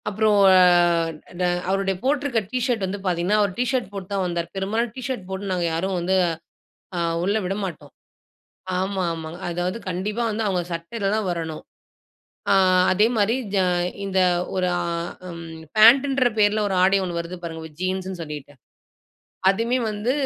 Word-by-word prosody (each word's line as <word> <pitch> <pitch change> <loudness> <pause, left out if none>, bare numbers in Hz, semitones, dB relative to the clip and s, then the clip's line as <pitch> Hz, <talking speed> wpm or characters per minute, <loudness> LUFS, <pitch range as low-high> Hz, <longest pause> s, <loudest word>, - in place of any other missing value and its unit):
அப்புறம் 215 0 +2 0.2
அ - - +7 0.8
ட - - -2 0.3
அவருடைய 195 0 0
போட்டிருக்க 275 -3 +1
டீ 255 - 0
ஷர்ட் 235 -6 0
வந்து 195 +2 -4
பார்த்தீங்ன்னா, 180 +2 +1
அவர் 200 -2 +1
டீ 245 - +2
ஷர்ட் 250 -7 -1
போட்டு 195 -2 -6
தான் 195 -1 0
வந்தாரு. 170 -1 -2
பெரும்பாலான 215 +5 -1
டீ 260 - -6
ஷர்ட் 245 -9 -4
போட்டு 190 +1 -4
நாங்க 180 -2 0
யாரும் 185 +3 -1
வந்து 180 +2 0 0.8
அ - - -1 0.2
உள்ள 200 +3 +1
விடமாட்டோம். 180 -7 -4 0.9
ஆமா, 190 0 -1
ஆமா. 160 -1 -6 0.2
அதாவது 175 +4 -2
கண்டிப்பா 205 +6 -2
வந்து 220 +1 -2
அவுங்க 185 -3 0
சட்டையில 195 +5 -3
தான் 215 -3 -1
வரணும். 165 -2 -4 0.9
அ - - +6 0.4
அதேமாரி 215 +3 +2 0.2
ஜ - - +2 0.5
இந்த 190 -1 0 0.3
ஒரு 185 -1 +1
ஆ - - -1 0.6
ம் 165 -1 -9
பேண்ட்டுன்ற 260 +4 +6
பெயர்ல 210 0 +3
ஒரு 195 - -1
ஆடை 195 +2 +4
ஒன்னு 175 -2 -3
வருது 170 +2 -7
பாருங்க. 160 -1 -6
ஜீன்ஸ்ன்னு 185 0 -3
சொல்லிட்டு. 150 -2 -8 1.0
அதுவுமே 230 +5 0
வந்து 210 +4 -1
195 Hz, 155 wpm, -23 LUFS, 175-215 Hz, 1.0 s, அ